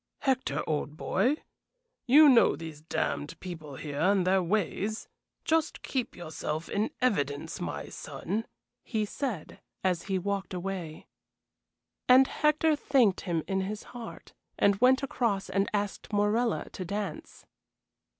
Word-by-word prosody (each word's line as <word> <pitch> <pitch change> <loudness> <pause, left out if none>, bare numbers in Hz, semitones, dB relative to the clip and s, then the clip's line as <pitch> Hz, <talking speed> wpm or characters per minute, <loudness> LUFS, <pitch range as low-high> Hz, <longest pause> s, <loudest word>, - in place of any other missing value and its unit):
"Hector, 265 -1 0
old 150 -1 -2
boy, 235 - +1 0.7
you 295 +5 +8
know 250 -4 +6
these 160 -2 -8
damned 155 -2 -2
people 160 -6 -7
here 145 +1 -5
and 190 +1 +3
their 190 +1 +4
ways. 205 +3 -1 0.4
Just 320 0 +1
keep 260 -3 -2
yourself 160 -1 -4
in 210 +2 0
evidence, 145 - 0
my - - -4
son," 215 +5 -4 0.4
he 215 -3 -1
said, 210 - -4 0.2
as 180 -3 0
he 190 - +2
walked 195 0 -2
away. 180 -3 -5 1.0
And 260 +1 +8
Hector 305 +2 +2
thanked 260 -9 +3
him 170 -4 -1
in 190 -1 0
his 205 +2 -4
heart, 240 -2 -9 0.2
and 200 +1 +3
went 260 +2 +5
across 230 -7 -1
and 195 0 +1
asked 205 0 -3
Morella 210 +3 +1
to 185 - -5
dance. 200 +3 -5
200 Hz, 130 wpm, -29 LUFS, 175-240 Hz, 1.0 s, you